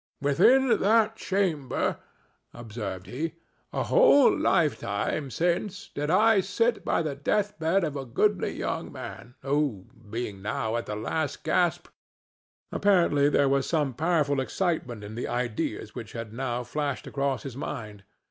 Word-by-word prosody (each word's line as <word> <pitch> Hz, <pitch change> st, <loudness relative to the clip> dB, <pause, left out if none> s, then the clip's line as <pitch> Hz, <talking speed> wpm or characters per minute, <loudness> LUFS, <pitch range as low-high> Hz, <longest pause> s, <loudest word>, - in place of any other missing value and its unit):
"Within 240 Hz, -, +4 dB
that 220 Hz, +1 st, +3 dB
chamber," 180 Hz, -, -1 dB, 0.6 s
observed 105 Hz, -5 st, -6 dB
he, 160 Hz, +6 st, -4 dB, 0.4 s
"a -, -, -1 dB
whole -, -, +6 dB
lifetime 145 Hz, -3 st, 0 dB
since, 175 Hz, -, -1 dB
did 150 Hz, +1 st, -2 dB
I 215 Hz, +4 st, +5 dB
sit 230 Hz, +5 st, 0 dB
by -, -, +1 dB
the 155 Hz, -2 st, -2 dB
death 205 Hz, +9 st, -1 dB
bed 165 Hz, +4 st, +2 dB
of 150 Hz, -3 st, -2 dB
a 140 Hz, -, -3 dB
goodly 190 Hz, -, +1 dB
young -, -, -3 dB
man 125 Hz, +1 st, -9 dB
who, 135 Hz, -8 st, 0 dB, 0.2 s
being 110 Hz, -3 st, -4 dB
now 110 Hz, +2 st, -2 dB
at 120 Hz, -, -3 dB
the 105 Hz, -, -3 dB
last 145 Hz, +8 st, -3 dB
gasp—" 175 Hz, -1 st, +1 dB, 0.8 s
Apparently, 170 Hz, -8 st, +3 dB
there 145 Hz, -1 st, +3 dB
was 135 Hz, 0 st, +1 dB
some 150 Hz, -5 st, +1 dB
powerful 150 Hz, -2 st, +1 dB
excitement 130 Hz, -, -2 dB
in 105 Hz, +1 st, -8 dB
the 120 Hz, -, -4 dB
ideas 120 Hz, -3 st, -3 dB
which -, -, -8 dB
had 115 Hz, -2 st, -6 dB
now 125 Hz, 0 st, -2 dB
flashed 140 Hz, +2 st, -3 dB
across 140 Hz, -2 st, -2 dB
his 135 Hz, -4 st, -7 dB
mind. 105 Hz, -7 st, -6 dB
145 Hz, 145 wpm, -27 LUFS, 120-180 Hz, 0.8 s, whole